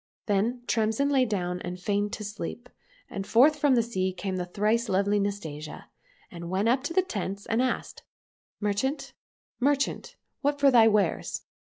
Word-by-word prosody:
" - - -75
Then 225 +4 0
Tremsin 225 +5 +1
lay 265 -2 +4
down 180 -5 -2
and 180 +1 -5
feigned 205 +2 0
to 215 - -4
sleep, 220 +4 -6 0.4
and 195 0 -6
forth 295 +6 +5
from 285 -2 +4
the 235 - +3
sea 190 -5 -1
came 185 +1 -4
the 180 -1 -3
thrice 215 +5 0
lovely 200 +2 +2
Nastasia, 160 -7 -5 0.4
and 170 -1 -7
went 190 +4 0
up 255 +2 +3
to 330 - -2
the 375 - +4
tents 200 - -4
and 225 +2 +1
asked, 255 - -2 0.3
*' - - -78
Merchant, 210 +8 -1 0.5
merchant, 275 +1 0 0.3
what 285 0 0
for 280 -1 +5
thy 230 -3 +7
wares 205 -5 +1
210 Hz, 175 wpm, -27 LUFS, 195-250 Hz, 0.5 s, thy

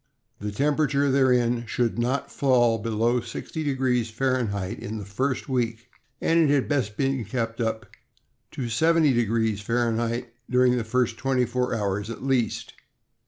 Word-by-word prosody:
The 105 0 -4
temperature 140 +2 +1
therein 125 -3 +2
should 120 +1 -1
not 125 +3 -1
fall 120 -4 +3
below 115 +3 +1
60° 130 -3 -2
Fahrenheit 110 -6 -1
in 110 +2 -5
the 105 - -6
first 130 +9 -2
week, 120 -2 -2 0.3
and 165 +1 +2
it 160 -3 +4
had 140 -3 +2
best 125 -8 -1
be 135 -3 0
kept 115 +1 -3
up 110 -1 -2 0.7
to 135 - -4
70° 115 -6 +2
Fahrenheit 120 +1 -1 0.2
during 125 0 +4
the 120 - -1
first 115 +1 0
twenty 130 -2 +1
four 125 0 -1
hours 105 0 -2
at 115 - -7
least. 130 -3 0
120 Hz, 140 wpm, -25 LUFS, 115-130 Hz, 0.7 s, it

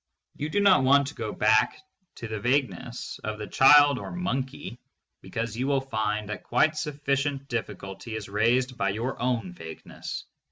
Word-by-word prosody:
You 150 - -4
do 205 - +1
not 195 -5 +6
want 140 +2 +5
to - - -10
go 110 -2 -4
back 110 +1 +3 0.4
to 115 - -7
the 110 -1 -4
vagueness 125 0 -2
of 110 0 -3
the 105 - -5
child 145 +3 +6
or - - -7
monkey, 175 -8 -4 0.4
because 115 -1 -4
you 130 +3 -1
will 140 -1 +2
find 105 -5 -2
that 105 - -5
quite 155 0 +2
sufficient 140 -2 -2
difficulty 110 -3 -5
is 110 -2 -5
raised 120 +5 +1
by 100 - +1
your 115 +6 -3
own 120 -7 -1
vagueness. 80 -2 -8
125 Hz, 165 wpm, -27 LUFS, 110-140 Hz, 0.4 s, not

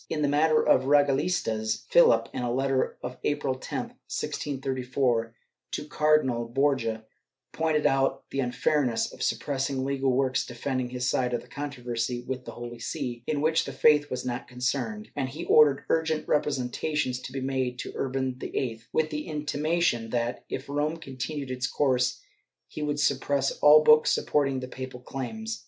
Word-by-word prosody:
In 150 - -1
the - - +3
matter 155 +2 +3
of - - +5
the 130 - -6
regalistas, 140 -6 +1
Philip, 115 -9 +5
in - - -3
a 120 -1 -1
letter 135 +1 0
of 125 +1 -5
April 145 -2 0
10, 130 - -4 0.3
1634, 130 -4 -1 0.4
to - - -3
Cardinal 150 -6 +2
Borja, 120 -4 0 0.5
pointed 160 -2 0
out 135 0 +1
the 135 - -2
unfairness 125 0 0
of - - -11
suppressing 135 +3 -1
legal 135 -1 +1
works 130 0 +1
defending 130 +1 -3
his 125 0 -2
side 125 -1 +1
of - - -4
the - - -17
controversy 125 -4 -3
with 130 -1 -4
the - - -7
Holy 120 0 -8
See, 120 +1 -4
in 145 -2 0
which 160 +2 +2
the - - -5
faith 150 -1 +4
was 125 - -4
not 125 0 -3
concerned, 130 - -3
and 135 -3 -1
he 155 +6 -6
ordered 145 -3 +5
urgent 160 -1 0
representations 140 -1 0
to 130 - -8
be 135 - -4
made 130 -2 -1
to - - -5
Urban 130 -1 -1
VIII, 115 -4 -3
with 155 0 +1
the 150 +2 -4
intimation 150 -4 0
that, 120 0 -2
if 130 - -5
Rome 145 +3 -1
continued 135 -2 -5
its 125 0 -1
course, 130 -3 +1 0.5
he - - -7
would 145 -1 -1
suppress 140 0 +1
all 150 +1 +8
books 155 0 +6
supporting 135 -3 +1
the 130 - -5
papal 130 -1 -7
claims. 115 -4 -5
135 Hz, 165 wpm, -27 LUFS, 125-150 Hz, 0.5 s, all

